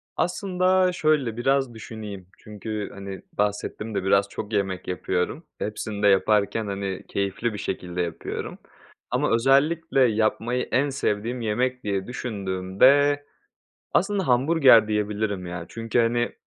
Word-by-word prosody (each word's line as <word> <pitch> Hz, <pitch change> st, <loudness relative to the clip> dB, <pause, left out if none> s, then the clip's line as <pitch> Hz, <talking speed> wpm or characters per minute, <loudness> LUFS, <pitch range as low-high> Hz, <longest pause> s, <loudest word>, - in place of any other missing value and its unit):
Aslında 185 Hz, 0 st, +2 dB
şöyle 150 Hz, -9 st, +1 dB
biraz 135 Hz, 0 st, +1 dB
düşüneyim. 105 Hz, -4 st, -8 dB
Çünkü 105 Hz, 0 st, -6 dB
hani, 100 Hz, -1 st, -7 dB
bahsettim 105 Hz, +1 st, -2 dB
de -, -, -1 dB
biraz 100 Hz, +1 st, +3 dB
çok 105 Hz, +2 st, -6 dB
yemek 95 Hz, -3 st, -1 dB
yapıyorum. 90 Hz, -, -2 dB
Hepsini 105 Hz, -1 st, -4 dB
de -, -, +6 dB
yaparken 105 Hz, +2 st, +2 dB
hani, 100 Hz, -1 st, -4 dB
keyifli 100 Hz, +3 st, -2 dB
bir -, -, -5 dB
şekilde 90 Hz, -2 st, -3 dB
yapıyorum. 85 Hz, -2 st, -5 dB, 0.5 s
Ama -, -, +1 dB
özellikle 135 Hz, +4 st, +3 dB
yapmayı 115 Hz, +1 st, +1 dB
en 140 Hz, +3 st, +2 dB
sevdiğim 120 Hz, -2 st, -2 dB
yemek 125 Hz, +4 st, -1 dB
diye 100 Hz, -2 st, -2 dB
düşündüğümde 125 Hz, +6 st, +2 dB, 0.7 s
aslında 195 Hz, -1 st, +1 dB
hamburger 130 Hz, -3 st, +5 dB
diyebilirim 105 Hz, -2 st, -1 dB
yani. 85 Hz, -1 st, -6 dB
Çünkü 115 Hz, +1 st, -2 dB
hani, 120 Hz, +1 st, +2 dB
110 Hz, 125 wpm, -25 LUFS, 100-130 Hz, 0.7 s, de